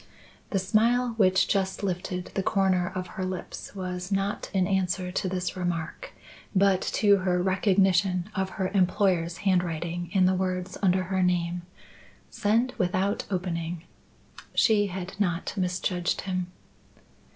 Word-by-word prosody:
The 195 - 0
smile 230 +6 +2
which 190 -2 +4
just 195 -1 0
lifted 180 -1 -3
the 195 - 0
corner 190 -2 +1
of 185 -1 -2
her 185 - -6
lips 185 +2 -6
was 180 0 -4
not 195 +1 -1
in 190 -3 +2
answer 185 -1 0
to 185 +1 -1
this 180 -1 -2
remark, 175 -3 -3 0.4
but 195 -1 +4
to 205 -2 +3
her 185 -1 +1
recognition 190 -1 +2
of 190 -1 -1
her 185 -1 0
employer's 180 -3 +1
handwriting 175 -2 0
in 190 -3 +4
the 185 - +4
words 185 0 -2
under 185 -1 +3
her 190 +1 -1
name: 175 -1 +1 0.7
Send 230 +5 +1
without 185 +3 0
opening. 175 -3 -3 0.7
She 210 -3 +4
had 190 +1 -6
not 175 -4 0
misjudged 180 -1 -1
him. 185 -2 -2
185 Hz, 135 wpm, -27 LUFS, 180-195 Hz, 0.7 s, which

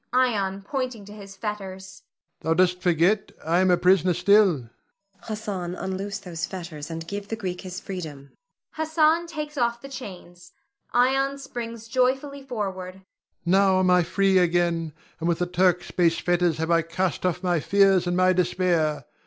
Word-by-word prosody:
Ion 200 -7 +1
[pointing 255 -3 -4
to 205 - -11
his 200 -2 -11
fetters]. 195 -2 -6 0.4
Thou 160 +1 0
dost 180 +1 +2
forget 180 +4 +2
I 165 +2 +2
am 185 0 +3
a 180 - +5
prisoner 180 -1 +3
still. 200 +2 +5
Zuleika. 120 -5 -10 0.6
Hassan, 205 -5 -4
unloose 195 +2 -4
these 170 -5 -5
fetters, 170 -5 -7
and 165 0 -6
give 200 +1 -5
the 225 - -3
Greek 185 -5 -5
his 185 -2 -6
freedom. 155 -7 -7 0.4
[Hassan 315 +1 +2
takes 300 -3 -5
off 235 -1 +1
the 275 - -10
chains; 180 -8 -10 0.4
Ion 270 +3 +2
springs 230 -4 -7
joyfully 265 +3 0
forward.] 190 -8 -5
Ion. 190 - -19 0.4
Now 190 +1 +4
am 185 -1 +3
I 180 0 +5
free 190 +3 +2
again, 170 -2 +1 0.3
and 165 +1 -1
with 170 - +1
the 180 - 0
Turk's 180 0 +1
base 170 -2 +2
fetters 175 -2 +1
have 160 +1 -1
I 165 0 +4
cast 165 +3 -2
off 180 0 -1
my 175 -2 +2
fears 195 +2 +3
and 175 0 0
my 185 0 +4
despair. 175 -4 +1
185 Hz, 170 wpm, -25 LUFS, 175-215 Hz, 0.6 s, a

